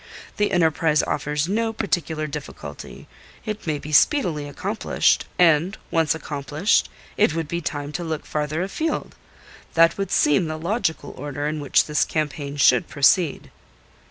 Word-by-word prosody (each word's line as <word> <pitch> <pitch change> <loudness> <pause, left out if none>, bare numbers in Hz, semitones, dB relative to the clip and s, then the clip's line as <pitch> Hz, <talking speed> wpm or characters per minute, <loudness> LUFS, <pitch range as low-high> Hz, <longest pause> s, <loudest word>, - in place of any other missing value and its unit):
The 205 -1 +1
enterprise 160 -3 +2
offers 150 +1 -1
no 225 +4 0
particular 170 -7 -2
difficulty; 150 - -8 0.4
it 215 -4 -5
may 155 -2 0
be 150 +1 -8
speedily 155 - +3
accomplished, 200 +9 0
and 170 +2 +3
once 165 -2 +2
accomplished, 150 +4 0 0.3
it 205 -6 +3
would 165 -2 -2
be 170 +3 -3
time 145 -2 -4
to 175 - -4
look 160 -2 -4
farther 155 +3 -2
afield. 310 +11 -3 0.6
That 165 +3 +4
would 195 -2 -2
seem 150 +1 +3
the 155 0 -4
logical 170 -1 -2
order 145 +1 -5
in 155 0 -2
which 145 -2 +3
this 150 -1 +1
campaign 145 -2 -3
should 125 -3 +4
proceed." 145 +2 +2
160 Hz, 145 wpm, -23 LUFS, 150-180 Hz, 0.6 s, That